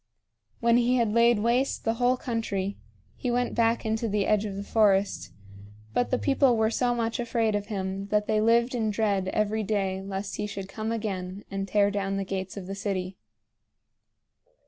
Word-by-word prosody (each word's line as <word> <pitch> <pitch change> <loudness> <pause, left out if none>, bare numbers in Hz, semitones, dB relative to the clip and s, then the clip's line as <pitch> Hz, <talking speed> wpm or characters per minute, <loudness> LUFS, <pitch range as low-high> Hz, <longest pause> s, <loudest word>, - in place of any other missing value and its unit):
When 235 0 +4
he 245 +1 +3
had 230 -4 +1
laid 235 0 +5
waste 245 +4 +1
the 225 - +2
whole 250 +1 +3
country 200 -6 -2 0.4
he 250 - -3
went 245 +1 0
back 230 0 +1
into 220 +1 -1
the 205 -1 +1
edge 215 0 +2
of 200 -2 -4
the 200 - -4
forest; 205 -2 +2 0.6
but 245 - +1
the 255 - +1
people 270 -3 +3
were 220 0 +2
so 245 0 +1
much 230 0 -1
afraid 230 -2 0
of 205 0 -2
him 195 -1 -3
that 210 0 +1
they 215 0 +1
lived 235 +3 +3
in 225 -3 0
dread 205 -3 0
every 215 +2 0
day 195 -2 -1
lest 195 +1 -5
he 210 - -2
should 195 -2 -6
come 215 +3 -4
again 195 -4 -4
and 195 0 -3
tear 205 +1 +3
down 195 -1 -1
the 195 - -2
gates 190 0 -4
of 195 - -6
the 195 - -5
city. 195 -2 -3
215 Hz, 190 wpm, -27 LUFS, 195-230 Hz, 0.6 s, laid